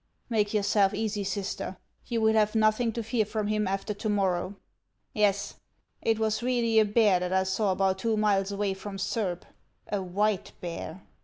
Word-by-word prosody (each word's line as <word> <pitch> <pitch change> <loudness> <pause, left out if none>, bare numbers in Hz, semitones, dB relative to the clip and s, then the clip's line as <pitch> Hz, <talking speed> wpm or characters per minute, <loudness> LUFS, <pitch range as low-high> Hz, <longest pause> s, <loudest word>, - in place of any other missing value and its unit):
" - - -43
"Make 210 -2 +1
yourself 205 -2 +2
easy, 210 -1 -2
sister; 195 -1 -4 0.3
you 230 -1 -1
will 220 0 +4
have 215 0 +2
nothing 220 +2 +3
to 230 - -3
fear 225 0 +1
from 215 0 -3
him 210 -1 0
after 195 +2 -2
to 210 +2 -4
morrow. 195 -2 0 0.6
Yes, 205 -2 +1 0.4
it 225 -1 +1
was 220 0 0
really 235 -2 +2
a 215 - +5
bear 210 -3 +4
that 180 0 -3
I 190 0 +3
saw 190 +2 0
about 190 0 +1
two 225 +1 0
miles 205 -2 +2
away 200 -1 -1
from 195 +1 -7
Surb, 195 -2 -2 0.2
— - - -43
a - - -3
white 195 +2 -1
bear. 175 +1 -6
205 Hz, 185 wpm, -28 LUFS, 195-220 Hz, 0.6 s, a